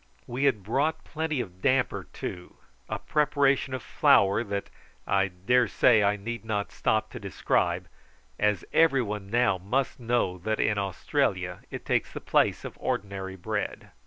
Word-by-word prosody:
We 130 +4 -1
had 115 -8 +2
brought 145 +9 0
plenty 155 -4 -2
of 90 -4 -9
damper 130 +2 +1
too, 90 -1 -7 0.3
a - - -2
preparation 140 -3 +1
of 125 - -6
flour 100 +3 +4
that, 100 -2 -4 0.3
I 95 0 +2
dare 100 +7 +2
say, 115 -4 +4
I 100 0 +3
need 115 +3 -5
not 105 -2 -2
stop 110 0 0
to - - -7
describe, 100 -4 0 0.5
as 105 -1 +1
every 140 -6 +4
one 105 -2 -5
now 115 -4 +2
must 125 +10 -1
know 115 -6 0
that 110 +5 -2
in 105 -1 +2
Australia 100 -2 -1
it - - -7
takes - - 0
the - - -6
place - - +1
of - - -8
ordinary 95 -1 -3
bread. 90 - -4
110 Hz, 160 wpm, -27 LUFS, 100-130 Hz, 0.5 s, flour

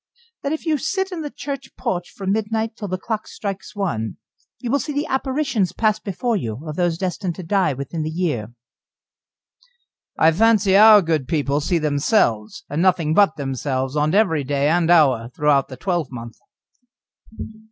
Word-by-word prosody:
"That 280 - -2
if 315 - -3
you 310 -3 +1
sit 380 +5 -2
in 345 -3 -4
the 295 - -4
church 280 -1 -7
porch 175 -1 -3
from 195 -1 -4
midnight 220 +1 -1
till 205 - -6
the 185 0 -2
clock 215 +3 -4
strikes 195 -1 -6
one, 115 - -2 0.4
you 240 - -4
will 280 - +2
see 295 +2 -4
the 290 +2 -1
apparitions 265 -7 -1
pass 215 -1 +1
before 230 +4 -2
you 115 - -3
of 155 - -5
those 175 -2 0
destined 180 -1 -3
to 185 - -7
die 180 -3 +1
within 140 +5 -5
the 155 - -2
year." 155 -10 -2 1.7
"I 160 - +5
fancy 205 +1 +3
our 210 0 +8
good 160 -5 -1
people 145 -2 0
see 170 +4 +1
themselves, 145 - +1
and 150 +3 -2
nothing 175 -4 +2
but 200 -2 +4
themselves, 135 -1 -3
on 150 +3 +1
every 185 -9 +2
day 140 +1 0
and 170 0 +2
hour 135 -9 +4
throughout 145 -3 +2
the 130 - -10
twelvemonth." 130 - -4
175 Hz, 170 wpm, -21 LUFS, 145-215 Hz, 1.7 s, our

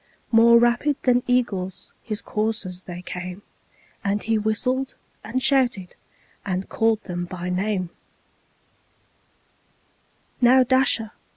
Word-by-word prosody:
More 235 0 +7
rapid 240 +5 +2
than 250 -1 +3
eagles 200 -7 -1
his 215 -1 -5
coursers 210 -4 -3
they 175 0 -8
came, 180 +2 -6 0.6
And 200 +1 -1
he 225 +1 +1
whistled, 255 +5 -1 0.3
and 250 +4 -3
shouted, 245 -9 +1 0.5
and 190 -1 -3
called 225 -1 +1
them 175 -2 -4
by 180 0 -6
name; 185 -1 -1 2.5
"Now, 255 +2 +6
Dasher! 255 -4 +2
220 Hz, 105 wpm, -23 LUFS, 185-245 Hz, 2.5 s, More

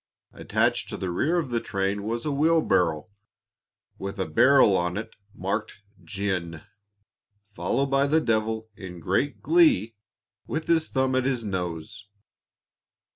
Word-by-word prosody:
Attached - - 0
to - - -5
the 95 -2 -3
rear 150 - +1
of 150 -7 -2
the 120 - +1
train 100 -1 -2
was 115 +3 -3
a 150 - 0
wheelbarrow, 140 - +2 0.9
with 100 0 -6
a 95 - 0
barrel 115 - +5
on 90 +1 -1
it, 110 - -5 0.2
marked 105 +2 -4 0.2
"Gin," 95 -5 -3 0.9
followed 120 +11 -1
by 135 +1 +3
the 155 +3 +3
devil, 110 -4 -1
in 90 -3 -9
great 95 - -1
glee, 315 - +4 0.5
with 160 0 -3
his 160 -2 +2
thumb 130 -1 0
at 130 0 +1
his 130 -3 -1
nose. 95 0 -5
110 Hz, 135 wpm, -25 LUFS, 95-135 Hz, 0.9 s, barrel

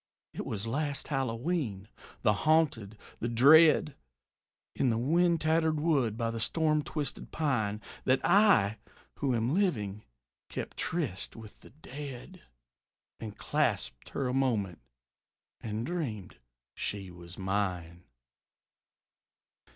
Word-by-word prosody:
It - - -5
was 105 0 -3
last 140 +5 -2
Hallowe'en, 125 - -2 0.4
the 105 -3 +4
haunted, 115 -5 +1 0.2
the 120 - -2
dread, 145 +5 +6 0.8
In 130 - +2
the 115 - +1
wind 170 +7 +2
tattered 160 0 +2
wood 140 -9 +1
by 115 -1 -1
the 115 - -4
storm 155 +7 +2
twisted 145 -2 -4
pine, 110 -9 -1 0.2
That 130 +1 +3
I, 175 - +5 0.4
who 135 -4 +1
am 115 +4 0
living, 110 - 0 0.5
kept - - -6
tryst 150 - -2
with 110 -2 -12
the - - -15
dead, 145 +3 -9 0.8
And 110 -2 -7
clasped - - -1
her 135 - -2
a 125 - -1
moment 115 -10 0 0.8
and 110 +1 -4
dreamed 135 - -4 0.4
she 100 -3 -4
was 85 0 -12
mine. 90 -3 -2
125 Hz, 115 wpm, -30 LUFS, 105-155 Hz, 0.8 s, dread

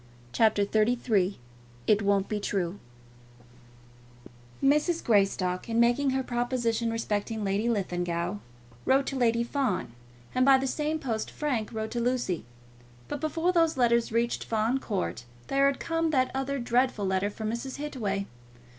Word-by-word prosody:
CHAPTER 215 - +3
XXXIII 215 -2 +1 0.5
"It 210 0 +4
Won't 200 -1 +2
Be 210 - -2
True" 195 -2 -2 1.8
Mrs. 300 +5 +3
Greystock, 195 -3 +1
in 230 0 +1
making 245 +4 +3
her 265 0 0
proposition 240 -2 -1
respecting 220 -1 -2
Lady 200 +4 0
Linlithgow, 175 -3 -1 0.5
wrote 270 +1 +3
to 275 - -3
Lady 235 -2 +2
Fawn, 235 - -1 0.4
and 255 - +3
by 270 0 +7
the 265 - -2
same 300 +3 -1
post 230 -7 -3
Frank 255 -8 -2
wrote 220 -1 -4
to 240 - -2
Lucy. 240 - -1 0.6
But 285 - -5
before 325 +3 +1
those 330 -4 +3
letters 235 -2 +3
reached 235 +1 0
Fawn 225 +4 0
Court 85 - -3 0.3
there 275 0 +4
had 275 - 0
come 330 0 0
that 260 -4 +2
other 270 +1 -2
dreadful 245 -3 +1
letter 190 +1 +1
from 215 +1 -4
Mrs. 245 +3 -4
Hittaway. 220 -10 -3
235 Hz, 145 wpm, -28 LUFS, 205-265 Hz, 1.8 s, by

